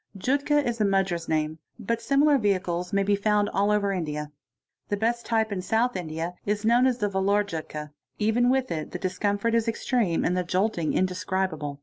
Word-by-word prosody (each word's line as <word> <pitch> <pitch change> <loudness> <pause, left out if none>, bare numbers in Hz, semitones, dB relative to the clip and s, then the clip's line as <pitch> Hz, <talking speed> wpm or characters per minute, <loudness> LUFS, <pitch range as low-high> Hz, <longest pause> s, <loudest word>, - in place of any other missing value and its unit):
('Jutka' 285 +6 +1
is 235 -1 -2
the 210 - +3
Madras 195 -4 0
name, 155 0 -1 0.4
;similar 280 +4 +3
vehicles 180 -4 -1
may 200 0 +2
be 200 +1 +2
found 205 0 +1
all 200 0 +1
over 205 -1 +2
India.) 150 -4 -3 0.6
The 205 - 0
best 235 +3 -1
type 220 -2 +1
in 200 - -2
uth 225 +6 +1
India 165 -1 -4
is 210 +1 -1
known 240 +3 +5
as 250 -2 +1
the 210 -4 0
Vellore 200 +1 +2
Jutka—yet 155 -4 -6 0.3
even 220 +3 +2
with 260 -1 +1
it 155 -2 -4
the - - -2
dis 185 -1 -4
mfort 205 +2 0
is 230 0 +2
extreme 225 -5 0
and 180 - +1
the 180 - 0
jolting 180 -2 0
indescribable. 180 -5 -1
200 Hz, 190 wpm, -26 LUFS, 180-230 Hz, 0.6 s, known